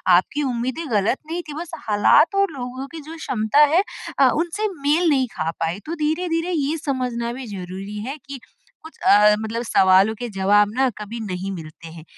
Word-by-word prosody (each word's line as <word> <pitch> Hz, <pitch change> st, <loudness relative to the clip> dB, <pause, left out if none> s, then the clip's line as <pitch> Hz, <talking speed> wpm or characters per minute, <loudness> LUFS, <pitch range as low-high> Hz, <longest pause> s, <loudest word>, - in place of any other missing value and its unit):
आपकी 285 Hz, +11 st, +1 dB
उम्मीदें 255 Hz, +5 st, -2 dB
गलत 210 Hz, +4 st, +2 dB
नहीं 340 Hz, +2 st, -3 dB
थी 295 Hz, -, -7 dB
बस 340 Hz, -1 st, -7 dB, 0.2 s
हालात 220 Hz, -, +4 dB
और 395 Hz, -2 st, +2 dB
लोगों 260 Hz, -1 st, -6 dB
की 325 Hz, +2 st, -9 dB
जो 315 Hz, +3 st, -10 dB
क्षमता 250 Hz, -4 st, 0 dB
है 370 Hz, +4 st, +5 dB, 0.4 s
अ, 265 Hz, -2 st, +6 dB
उनसे 350 Hz, +7 st, -1 dB
मेल 315 Hz, +4 st, +3 dB
नहीं 265 Hz, -3 st, +2 dB
खा 165 Hz, -, -3 dB
पाई। 165 Hz, +4 st, -2 dB
तो 330 Hz, +2 st, -4 dB
धीरे-धीरे 330 Hz, +2 st, -1 dB
ये 305 Hz, -1 st, 0 dB
समझना 250 Hz, -5 st, -2 dB
भी 260 Hz, 0 st, -7 dB
ज़रूरी 190 Hz, +3 st, -7 dB
है 275 Hz, +4 st, -5 dB
कि 275 Hz, -1 st, -7 dB, 0.5 s
कुछ 320 Hz, -, -12 dB
अ, 210 Hz, +1 st, +5 dB
मतलब 220 Hz, +2 st, -3 dB
सवालों 190 Hz, -1 st, +4 dB
के 245 Hz, +2 st, -5 dB
जवाब 205 Hz, +1 st, +3 dB
ना 265 Hz, 0 st, +3 dB
कभी 215 Hz, +2 st, -7 dB
नहीं 195 Hz, -2 st, -4 dB
मिलते 165 Hz, -2 st, -9 dB
हैं। 160 Hz, -1 st, -11 dB
250 Hz, 185 wpm, -22 LUFS, 205-310 Hz, 0.5 s, अ